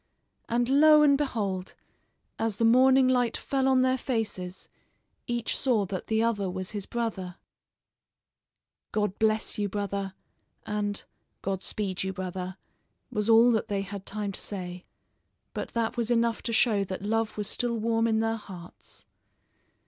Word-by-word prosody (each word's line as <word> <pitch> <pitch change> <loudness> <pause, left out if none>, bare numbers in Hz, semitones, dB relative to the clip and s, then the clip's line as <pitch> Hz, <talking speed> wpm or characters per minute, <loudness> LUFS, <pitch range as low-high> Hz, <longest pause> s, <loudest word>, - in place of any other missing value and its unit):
And 240 +1 +1
lo! 300 +3 +7
and 285 -1 +6
behold, 205 -10 -2 0.6
as 225 -2 -1
the 230 - +2
morning 260 +3 +6
light 245 -2 +2
fell 270 -1 0
on 260 -1 +4
their 260 0 +2
faces, 210 -8 -3 0.6
each 240 -1 -1
saw 235 -7 +2
that 185 -1 -5
the 220 0 +2
other 205 -5 0
was 185 +1 -4
his 205 -2 -4
brother. 195 -7 -3 1.6
"God 210 -2 -1
bless 220 -1 +1
you, 205 -1 0
brother," 200 -1 -3 0.5
and 205 -1 -2 0.4
"God 190 -1 -2
speed 195 -2 -3
you, 190 0 -2
brother," 185 0 -5 0.5
was 210 +1 -1
all 230 +2 +7
that 220 -2 0
they 200 -1 -1
had 195 0 -8
time 210 -1 -3
to - - -5
say, 180 -3 -6 0.7
but - - -5
that 230 0 0
was 235 -1 -1
enough 235 -1 +2
to 235 - -3
show 220 -3 +3
that 190 0 -5
love 220 +1 -1
was 210 -1 -2
still 240 -1 0
warm 225 +1 +1
in 220 -1 +2
their 225 0 0
hearts. 180 -5 -12
215 Hz, 155 wpm, -28 LUFS, 195-235 Hz, 1.6 s, lo